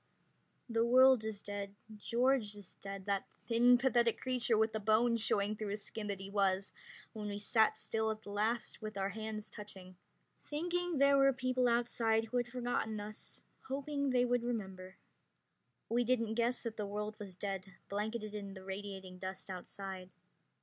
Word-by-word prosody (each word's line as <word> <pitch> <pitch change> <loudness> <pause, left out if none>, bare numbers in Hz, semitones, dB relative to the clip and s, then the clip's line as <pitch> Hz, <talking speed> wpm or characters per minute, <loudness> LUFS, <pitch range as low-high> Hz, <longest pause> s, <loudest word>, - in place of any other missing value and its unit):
The 230 -1 +2
world 255 0 +7
is 210 -2 -4
dead.... 205 -1 -5 0.2
George 235 0 +1
is 205 -3 -10
dead, 195 -1 -6
that 200 -1 0
thin, 245 +1 +5
pathetic 240 -3 +3
creature 245 -3 +1
with 220 0 +3
the 220 - -1
bones 225 +2 +3
showing 210 -1 +2
through 215 0 -4
his 205 +1 -4
skin 215 -2 -5
that 200 -2 -3
he 195 - -6
was 195 -1 +1 0.4
when 210 -1 -5
we 205 0 -3
sat 220 +2 +3
still 220 0 -1
at 220 0 -3
the 205 - -8
last 220 +5 -1
with 215 -1 -5
our 195 0 0
hands 215 +1 -5
touching, 190 -3 -9 0.5
thinking 350 +2 -1
there 280 0 +6
were 275 0 +6
people 255 -1 +1
outside 230 -1 +2
who 245 +2 -2
had 245 0 +1
forgotten 240 -3 -1
us, 210 +1 -6 0.2
hoping 280 +1 -1
they 250 -1 +4
would 245 0 +2
remember. 190 -6 -4 0.9
We 240 +1 +2
didn't 230 -2 +1
guess 240 +2 +1
that 230 -2 -4
the 210 -2 -2
world 210 +1 -3
was 195 -3 -7
dead, 195 -1 -4
blanketed 215 +1 -3
in 200 -2 -5
radiating 190 -1 -6
dust 190 +1 -6
outside. 185 0 -6
220 Hz, 170 wpm, -35 LUFS, 200-240 Hz, 0.9 s, world